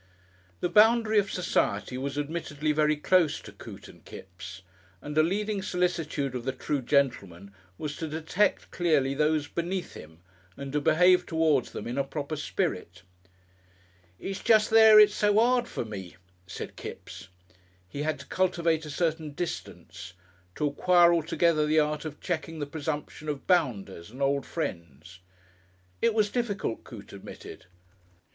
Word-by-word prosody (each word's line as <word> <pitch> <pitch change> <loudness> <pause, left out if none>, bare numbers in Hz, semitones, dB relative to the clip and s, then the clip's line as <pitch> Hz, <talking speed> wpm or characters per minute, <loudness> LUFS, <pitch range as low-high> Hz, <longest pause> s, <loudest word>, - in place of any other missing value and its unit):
The - - +1
boundary 220 +2 +5
of 200 0 -2
Society 125 - -1
was 140 +2 -4
admittedly 150 0 -2
very 150 0 +2
close 160 +1 +2
to - - -11
Coote - - -11
and - - -16
Kipps, 95 0 -11 0.4
and 150 +7 -7
a 155 - +6
leading 205 +4 -1
solicitude 170 -7 -1
of 125 -2 -4
the 135 - -1
true 135 +2 -3
gentleman 100 -9 -1 0.2
was 150 -2 -5
to 160 - -4
detect 160 +6 0
clearly 150 -6 +1
those 150 +1 +1
"beneath" 175 +3 -4
him, 80 +1 -12 0.4
and 140 0 -7
to 150 - +1
behave 180 +4 +4
towards 160 -5 +2
them - - -7
in 125 +4 -3
a - - +2
proper 145 +2 -5
spirit. 95 - -3 1.2
"It's 195 0 -5
jest 220 -2 +4
there 220 -1 +8
it's 210 -1 +7
so 210 0 +2
'ard 245 +1 +3
for - - -4
me," 95 -5 -8 0.3
said 95 - -7
Kipps. - - -9 0.6
He 140 +10 -6
had 155 0 -1
to - - -12
cultivate 170 -4 0
a - - -8
certain 155 -1 -2
"distance," 165 - -6 0.4
to 150 - -1
acquire 175 +4 +4
altogether 165 -1 +2
the 155 +1 +3
art 150 0 -1
of 150 -1 -7
checking 165 -2 -4
the 145 - -3
presumption 150 0 -5
of 145 -2 -4
bounders 105 - 0
and 125 +5 -12
old 140 0 0
friends. 85 - -6 0.8
It 230 -1 +2
was 210 -2 +2
difficult, 215 - -2
Coote 105 -5 -12
admitted. 100 -1 -11
155 Hz, 150 wpm, -27 LUFS, 135-180 Hz, 1.2 s, there